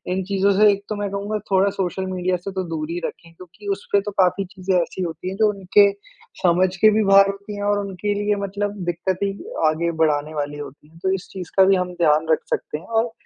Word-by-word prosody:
इन 190 - -1
चीज़ों 200 +1 +2
से 210 -1 +7
एक 200 0 -3
तो 215 - -2
मैं 205 -1 -3
कहूँगा 205 +2 -3
थोड़ा 195 +1 +4
सोशल 190 0 -2
मीडिया 180 0 0
से 180 +3 -7
तो 190 -1 -3
दूर 155 -1 -4
ही 175 - -2
रखें 165 0 -8
क्योंकि 185 +4 -14
उसपे 200 0 0
तो - - -6
काफ़ी 185 +1 +3
चीज़ें 185 0 -1
ऐसी 170 - -5
होती 170 +1 -4
हैं 190 - -5
जो 215 -1 +5
उनके 200 +1 +4 0.5
समझ 180 +1 +3
के 215 +3 +6
भी - - +3
बाहर 195 0 +6
होती 200 +1 -9
है 205 - -4
और 205 0 +1
उनके 200 +2 -2
लिए 205 0 +1
मतलब 205 +1 -3
दिक्कतें 185 +3 -1
ही 195 0 -6 0.2
आगे 170 +2 -1
बढ़ाने 150 0 0
वाली 145 0 -3
होती 145 +1 -10
है। 165 - -19
तो 190 0 +2
इस 195 - -8
चीज़ 180 -3 -7
का 190 - +8
भी 195 0 +5
हम 180 -1 -2
ध्यान 155 0 +3
रख 160 - +4
सकते - - -2
हैं - - -15
और 230 0 0
190 Hz, 240 wpm, -22 LUFS, 170-200 Hz, 0.5 s, का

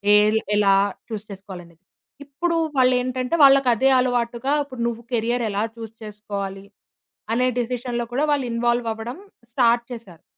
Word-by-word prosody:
L 215 +1 +4 0.2
ఎలా 200 -1 +4 0.3
choose 215 -2 -6
చేసుకోవాలనేది. 185 -3 -11 0.4
ఇప్పుడు 330 +5 -1 0.2
వాళ్ళు 255 -1 +5
ఏంటంటే, 255 +3 -2
వాళ్ళకి 275 -1 +6
అదే 265 +4 +3
అలవాటుగా 245 +2 0
ఇప్పుడు 255 -4 -9
నువ్వు 235 0 -4
కెరియర్ 235 +1 0
ఎలా 200 +1 -1
చూజ్ 225 -1 -9
చేసుకోవాలి, 200 -2 -6 0.7
అనే 250 +2 +2
డెసిషన్‌లో 240 0 -2
కూడా 280 +4 +1
వాళ్ళు 280 -3 +1
ఇన్‌వాల్వవ్వడం 235 +1 -1 0.4
స్టార్ట్ 235 -2 +3
చేశారు. 195 -9 -11
235 Hz, 135 wpm, -22 LUFS, 210-255 Hz, 0.7 s, వాళ్ళకి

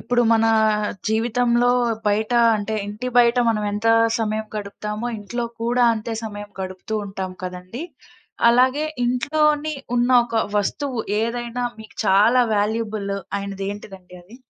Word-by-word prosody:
ఇప్పుడు 245 0 +1
మనా, 225 0 +4 0.6
జీవితంలో 240 +2 +2 0.4
బయట 215 +2 +1 0.2
అంటే, 215 +1 -2
ఇంటి 210 +5 -5
బయట 240 0 +5
మనం 215 -2 0
ఎంత 210 +2 0 0.3
సమయం 215 0 -1
గడుపుతామో, 210 +2 -5
ఇంట్లో 235 +4 -4 0.2
కూడా 240 +1 +2
అంతే 220 +1 -4
సమయం 205 -1 -7
గడుపుతూ 190 +3 -4
ఉంటాం 190 -2 -5
కదండీ! 185 - -7 0.7
అలాగే, 260 +5 +3 0.2
ఇంట్లోని 300 +4 +1 0.2
ఉన్న 245 +1 +2
ఒక 230 -2 0
వస్తువు 245 +5 -1 0.2
ఏదైనా 240 +1 -3
మీకు 220 -1 -13
చాలా 215 +6 +5
వాల్యూబుల్ 210 -1 -1 0.3
అయినది 195 -1 -5
ఏంటిదండి 195 -3 -10
అది? 210 +7 -15
220 Hz, 125 wpm, -22 LUFS, 205-240 Hz, 0.7 s, బయట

